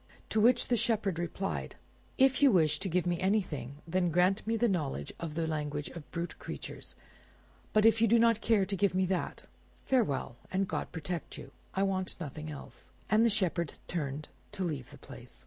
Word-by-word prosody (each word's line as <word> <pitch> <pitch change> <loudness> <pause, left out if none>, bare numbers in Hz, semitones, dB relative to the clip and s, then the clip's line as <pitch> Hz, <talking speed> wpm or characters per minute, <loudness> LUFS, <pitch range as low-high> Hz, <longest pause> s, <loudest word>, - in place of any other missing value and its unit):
To 215 - +2
which 240 +4 +4
the 245 - +4
Shepherd 210 -6 +1
replied— 180 +3 -3 0.4
"If 265 0 +4
you 280 -2 +7
wish 155 -6 +3
to 195 - -1
give 180 +1 +1
me 175 -1 0
anything, 175 - 0
then 180 +1 +1
grant 180 +5 +2
me 225 0 +1
the 240 +2 +3
knowledge 145 - -2
of 160 -3 -5
the 165 0 0
language 150 -2 -2
of 165 -4 -10
brute 170 0 -5
creatures; - - -7 0.8
but 215 0 +4
if 225 0 +5
you 230 - +6
do 235 +2 +5
not 230 -1 +4
care 215 -4 +3
to 195 - -2
give 195 0 +1
me 185 0 +3
that—farewell, 180 - -2
and 195 +1 +1
God - - -3
protect 170 +1 -5
you! - - -10 0.2
I 195 - +2
want 190 -2 -1
nothing 155 -1 -6
else." 145 -2 -10 0.2
And 215 +1 +5
the 235 - +5
Shepherd 180 -6 0
turned 150 -3 -3 0.3
to 195 -2 -2
leave 150 -8 -3
the - - -12
place. - - -12
185 Hz, 190 wpm, -31 LUFS, 155-215 Hz, 0.8 s, you